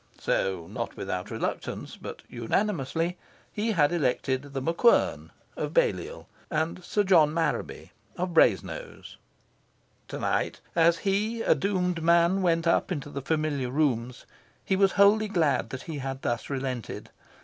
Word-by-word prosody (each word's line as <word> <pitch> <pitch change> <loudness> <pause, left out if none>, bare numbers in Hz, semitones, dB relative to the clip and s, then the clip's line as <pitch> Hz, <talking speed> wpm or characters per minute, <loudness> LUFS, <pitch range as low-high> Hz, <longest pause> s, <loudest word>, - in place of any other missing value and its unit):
So, 95 -4 -1
not - - -5
without - - -4
reluctance, - - -4
but - - -9
unanimously, 165 - -1 0.3
he 220 +2 0
had 150 -6 +3
elected 130 -4 0
The 140 -1 -6
MacQuern, 165 - +2 0.3
of - - -4
Balliol, - - 0 0.2
and 165 +3 -2
Sir 205 +3 +1
John 170 -6 +5
Marraby, 165 -1 -2 0.3
of 180 0 -2
Brasenose. 475 - +1 0.9
To - - -6
night, - - -1 0.2
as 170 0 +4
he, 215 +4 0
a - - +5
doomed 180 -3 -1
man, 170 +3 +4
went 165 -2 +2
up 170 - +2
into 145 -4 -4
the 140 - -4
familiar 145 -3 -1
rooms, 125 -4 -1 0.4
he 190 - +1
was 195 0 +3
wholly 205 +2 +5
glad 160 -9 +1
that 130 0 -6
he 160 -4 -6
had 135 0 -5
thus 120 -2 -2
relented. 130 -3 -4
165 Hz, 140 wpm, -27 LUFS, 135-195 Hz, 0.9 s, John